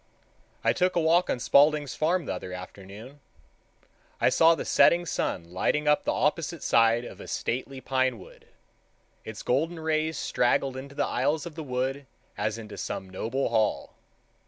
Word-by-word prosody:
I - - +3
took 180 0 +1
a - - +3
walk 170 +2 +3
on - - 0
Spaulding's 145 +1 +3
Farm 165 +5 0
the - - -3
other 90 0 -7
afternoon. 100 +8 -10 1.0
I - - +4
saw 165 0 +5
the - - -5
setting 175 +1 +4
sun 90 - -2
lighting 150 +10 0
up 150 0 +3
the - - +1
opposite - - -1
side 115 +1 +3
of - - -10
a - - -10
stately 130 +2 -3
pine 130 -2 0
wood. 95 - -15 0.8
Its 110 -1 -8
golden 160 +7 0
rays 160 0 -1
straggled 130 +2 0
into 140 +1 -8
the 145 - 0
aisles 145 +4 0
of 170 - -7
the 160 - -7
wood 135 0 -3 0.3
as 110 0 -2
into 110 -2 -9
some 95 - -5
noble 115 +8 -2
hall. 110 -2 0
135 Hz, 165 wpm, -27 LUFS, 115-155 Hz, 1.0 s, saw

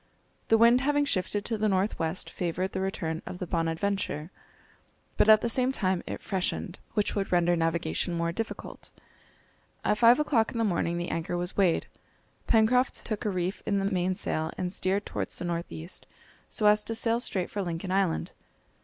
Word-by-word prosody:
The 225 - +5
wind 235 +2 +6
having 290 +1 +2
shifted 205 -3 -1
to 225 -2 -2
the 215 0 +2
north 195 +2 0
west 165 +2 -2
favoured 180 +2 -2
the 190 - -3
return 165 -4 -2
of 180 - -6
the 180 - -4
Bonadventure, 165 0 -2 0.8
but 215 - +3
at 215 0 +8
the - - 0
same 255 +2 +2
time 185 -8 0
it - - -5
freshened, 185 -1 -2 0.2
which 210 -2 +1
would 195 -2 -2
render 175 -1 +3
navigation 165 - 0
more 170 0 0
difficult. 225 +6 -6 1.0
At 210 - +2
five 235 +4 +7
o'clock 250 -7 +2
in - - -4
the 230 - +1
morning 170 -4 0
the 175 0 -3
anchor 165 +2 -2
was 175 +1 -3
weighed. 185 -4 +2 0.6
Pencroft 240 +3 +3
took 215 -2 -3
a - - +2
reef 185 0 -2
in 200 - +2
the 195 - 0
mainsail, 180 -4 -1
and 180 0 -2
steered 195 +2 -1
towards - - -4
the - - -4
north 170 0 -3
east, 165 +4 -8 0.4
so 215 - -2
as 210 0 +5
to 225 - -2
sail 230 +1 +2
straight 190 -7 -2
for 205 - -2
Lincoln 175 0 -4
Island. 190 -3 0
190 Hz, 185 wpm, -28 LUFS, 175-215 Hz, 1.0 s, at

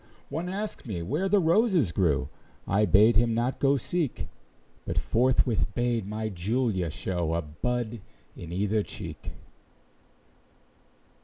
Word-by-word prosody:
One 170 +3 -3
asked 205 -5 -5
me 90 -6 -3
where 155 - -1
the 205 - +4
roses 175 - +3
grew; 75 -6 +1 0.4
I 105 +2 +3
bade 105 +5 +5
him 115 0 +2
not 120 +3 -1
go 140 0 +3
seek, 155 +2 -2 0.5
But - - -4
forthwith 115 -5 +2
bade 120 -4 0
my 110 +1 -3
Julia 100 -1 -1
show 85 0 -2
A 85 - -1
bud 115 +8 -3 0.3
in 85 -1 -9
either 105 +4 +1
cheek. - - -7
110 Hz, 130 wpm, -27 LUFS, 95-130 Hz, 0.5 s, bade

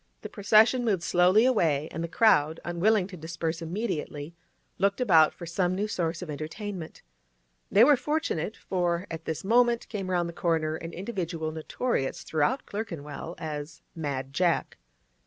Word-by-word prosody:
The - - -7
procession 220 +4 +4
moved 200 -7 0
slowly 180 +7 +4
away, 160 - +2
and 165 - -4
the - - -2
crowd, 165 -5 +3
unwilling 185 +4 +2
to 190 - -8
disperse 165 +1 -4
immediately, 165 -4 -4 0.5
looked 200 +3 +2
about 165 -11 +5
for 170 - -10
some 175 +2 0
new 205 +3 -1
source 170 -4 -2
of 175 - -9
entertainment. 160 +4 -6 0.7
They 210 - +6
were 290 +3 +7
fortunate, 285 - -2
for 175 -1 -1
at 165 - -6
this 160 - -3
moment 235 +3 +3
came 195 -4 -4
round 175 -2 +1
the 170 - -7
corner 160 -2 0
an 165 +1 -7
individual 175 -5 -4
notorious 160 - -2
throughout 160 - 0
Clerkenwell 170 -6 -6
as 150 -2 -6
'Mad 140 -4 -4
Jack. 175 +1 +1
175 Hz, 155 wpm, -27 LUFS, 160-210 Hz, 0.7 s, were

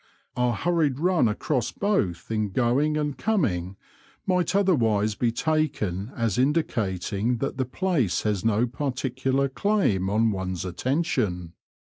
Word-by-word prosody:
Our 125 -1 +1
hurried 160 -3 +1
run 175 -4 +3
across 120 +4 -1
both 115 - -1
in 110 -2 0
going 130 +8 +1
and 150 -2 -1
coming 100 - -1 0.5
might 180 -1 +1
otherwise 115 - +2
be 115 +2 0
taken 120 - -1
as 115 -3 0
indi 150 +5 +3
cating 105 - -2
that 135 0 -3
the 130 - 0
place 130 - 0
has 105 -4 0
no 115 +1 +2
particular 130 +1 -1
claim 135 - +1
on 110 +2 +2
one's 95 -3 -3
attention. 105 - -1
125 Hz, 130 wpm, -25 LUFS, 105-150 Hz, 0.5 s, run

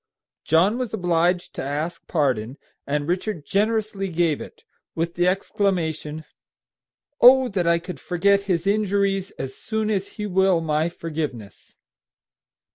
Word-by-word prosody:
John 185 +9 +3
was 245 -4 -2
obliged 175 -1 +1
to - - -5
ask 150 +5 -4
pardon, 130 -5 0 0.3
and 145 +1 -1
Richard 180 -2 -2
generously 210 0 0
gave 170 -4 0
it, - - -11 0.3
with 165 +1 -1
the 175 +1 +1
exclamation, 165 -5 -1 1.0
"Oh, 260 +1 +8
that 180 -4 -1
I 170 0 +4
could 180 +2 -7
forget 200 +3 +2
his 170 -2 +1
injuries 200 -1 +1
as 135 0 -5
soon 220 -1 -2
as 200 -1 -2
he 210 - -5
will 190 -2 +3
my 155 0 0
forgiveness!" 150 -11 -6
175 Hz, 130 wpm, -23 LUFS, 160-200 Hz, 1.0 s, Oh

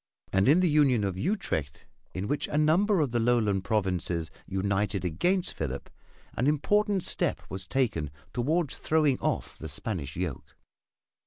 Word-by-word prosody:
And 95 +5 +4
in 165 +6 +6
the 180 - +4
Union 145 -8 +4
of 95 -2 -1
Utrecht, 95 - -2 0.3
in 95 +2 -2
which 145 +2 -1
a 145 - -2
number 170 +5 +3
of 140 -5 0
the 120 - +1
Lowland 115 -5 +2
provinces 90 -5 -1 0.2
united 95 0 -1
against 175 - 0
Philip, 70 -3 -4 0.4
an 125 - 0
important 200 +6 +2
step - - -1
was 95 -1 -5
taken 110 - 0 0.2
toward 150 +4 +1
throwing 150 -4 +2
off - - -2
the 80 - -6
Spanish 80 - -4
yoke. 85 -7 -5
115 Hz, 150 wpm, -28 LUFS, 95-155 Hz, 0.4 s, in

